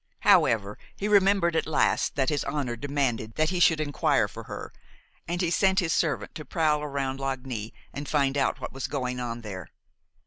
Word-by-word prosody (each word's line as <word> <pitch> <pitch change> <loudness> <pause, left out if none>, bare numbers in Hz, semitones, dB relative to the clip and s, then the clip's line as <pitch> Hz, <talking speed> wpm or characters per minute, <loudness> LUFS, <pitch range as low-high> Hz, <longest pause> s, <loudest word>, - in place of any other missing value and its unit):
However, 105 -2 +3 0.2
he 205 - -3
remembered 195 -4 +4
at - - +1
last 160 - +1
that 135 -2 +1
his 145 -2 0
honor 140 -4 -2
demanded 130 -4 -2
that 155 +2 +1
he 180 - -1
should 165 -2 +5
inquire 145 -2 +1
for - - -10
her, - - -7 0.5
and 175 +1 -2
he 170 -2 0
sent 190 +1 +3
his 175 -5 +2
servant 160 -4 0
to 155 - -7
prowl 155 -2 +1
around 135 -2 -3
Lagny 130 -5 -4 0.2
and 145 +1 -6
find 140 -2 +2
out 140 -1 +1
what - - -6
was 135 - -4
going 125 -3 -3
on 120 -1 -4
there. 95 -5 -7
145 Hz, 185 wpm, -27 LUFS, 125-160 Hz, 0.5 s, should